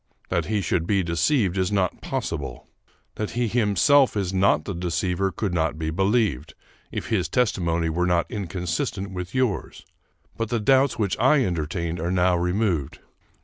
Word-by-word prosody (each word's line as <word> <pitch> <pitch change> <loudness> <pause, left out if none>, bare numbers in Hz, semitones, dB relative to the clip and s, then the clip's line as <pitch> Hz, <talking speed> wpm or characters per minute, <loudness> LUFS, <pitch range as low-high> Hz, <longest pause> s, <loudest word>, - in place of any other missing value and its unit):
That - - 0
he 105 -1 0
should 85 -1 -1
be 100 -2 +2
deceived 95 - +1
is 95 +1 0
not 95 -3 0
possible. 60 - -4 0.5
That 105 - -2
he 120 -1 +1
himself 125 +4 +3
is 95 -2 -1
not 95 -4 +3
the 100 - -3
deceiver 90 +2 -1
could 100 -3 -3
not 80 -2 0
be 80 0 -2
believed, 95 - 0 0.4
if - - -5
his - - 0
testimony 85 -9 +1
were 90 +3 0
not 85 -1 +2
inconsistent 95 -1 -3
with 90 +2 -6
yours; 130 -6 -1 0.5
but 115 -1 -3
the 120 -1 0
doubts 135 +4 +3
which 100 -4 0
I 130 +2 +4
entertained 85 0 -2
are 85 +2 -2
now 90 0 +3
removed. 90 -4 0
95 Hz, 160 wpm, -24 LUFS, 85-105 Hz, 0.5 s, I